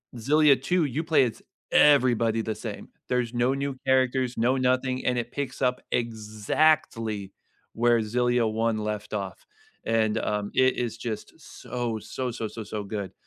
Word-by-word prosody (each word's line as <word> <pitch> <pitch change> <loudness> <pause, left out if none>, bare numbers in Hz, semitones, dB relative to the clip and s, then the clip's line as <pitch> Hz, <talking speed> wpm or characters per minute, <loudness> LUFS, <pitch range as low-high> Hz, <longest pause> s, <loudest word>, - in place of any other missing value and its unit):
Xillia 140 +3 +4
2, 175 +5 +1
you 145 +3 -2
play 160 -4 +4
as 115 - -5 0.3
everybody 120 -6 +4
the 110 -1 -3
same. - - -7 0.2
There's 125 -2 -1
no 120 +2 +2
new 140 0 -3
characters, 130 -1 +2
no 125 +4 +2
nothing, 130 0 0
and 125 0 +1
it 120 0 -3
picks 140 -2 -5
up 125 0 +1
exactly 110 -1 0 0.4
where 120 0 +3
Xillia 120 +1 +1
1 110 0 0
left 105 0 -4
off. 100 -2 -5 0.4
And, 110 -1 +1
um, 105 -2 -2
it 130 0 +3
is 120 -2 -2
just 115 -2 -6
so, 120 -2 -5
so, 125 +3 -4
so, 115 -1 -4
so, 110 +1 -7
so 105 0 -5
good, 100 -1 -5
120 Hz, 160 wpm, -26 LUFS, 110-130 Hz, 0.4 s, Xillia